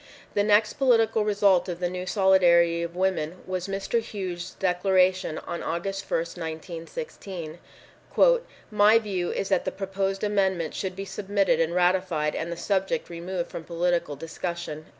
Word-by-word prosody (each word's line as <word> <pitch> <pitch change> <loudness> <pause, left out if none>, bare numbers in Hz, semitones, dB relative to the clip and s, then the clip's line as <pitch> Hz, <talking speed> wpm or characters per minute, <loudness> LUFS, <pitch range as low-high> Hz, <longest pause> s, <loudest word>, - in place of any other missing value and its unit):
The 205 - +2
next 210 +1 +3
political 225 -4 +3
result 200 -3 +3
of 175 -1 -4
the 180 - 0
new 180 +1 -5
solidarity 175 -4 +4
of 170 0 -4
women 185 -2 -1
was 185 0 -3
Mr. 195 +4 -1
Hughes' 185 -5 -6
declaration 185 -2 +2
on 170 - -5
August 195 +3 -3
1st, 165 +2 -2
1916: 165 - -7 1.1
"My 210 +1 +6
view 195 -6 -2
is 195 - -3
that - - +2
the - - -2
proposed 195 0 -3
amendment 190 -6 0
should 185 -2 -4
be 195 +1 -5
submitted 200 0 0
and 165 +1 +1
ratified 180 -4 +1
and 170 +1 -3
the 170 - -4
subject 195 +4 -1
removed 175 +1 -4
from 165 - -6
political 170 -3 -1
discussion." 165 0 -5
185 Hz, 150 wpm, -26 LUFS, 170-195 Hz, 1.1 s, My